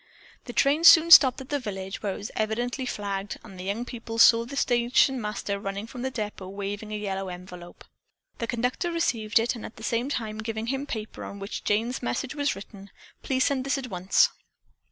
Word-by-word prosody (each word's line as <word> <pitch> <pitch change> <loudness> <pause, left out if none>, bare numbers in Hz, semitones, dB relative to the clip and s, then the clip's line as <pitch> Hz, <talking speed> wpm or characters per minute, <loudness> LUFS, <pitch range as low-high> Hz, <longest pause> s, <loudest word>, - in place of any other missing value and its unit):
The 245 - -6
train 290 +6 +2
soon 335 0 +8
stopped 265 -5 +9
at 265 +2 -8
a 290 - +1
village, 195 -5 -6
where 200 -3 -2
it - - -7
was 205 - -7
evidently 240 +4 -2
flagged, 200 -2 -4
and 190 -4 -12
the 180 - -6
young 210 +5 -2
people 230 -2 -7
saw 230 0 +6
the 270 +4 -8
station 245 +1 +2
master 210 -1 -3
running 200 +1 -4
from 245 +2 -9
the 265 - -1
depot 210 -6 -5
waving 200 +2 -5
a 210 - -2
yellow 195 -2 -3
envelope. 180 -1 -10 0.5
The 230 - -2
conductor 250 +9 -1
received 230 -11 0
it, 230 +2 +2
at 225 -1 -9
the - - -12
same 240 +3 -1
time 220 -6 -3
giving 220 0 -4
him 270 +1 -3
the - - -11
paper 220 -1 -5
on 200 - -7
which 200 +2 -6
Jane's 225 +5 0
message 120 - -3
was 290 -5 -1
written. 200 0 -11 0.3
"Please 260 -1 0
send 270 -2 0
this 275 +1 0
at 255 -4 -6
once." 185 +1 +3
225 Hz, 205 wpm, -26 LUFS, 200-255 Hz, 0.5 s, stopped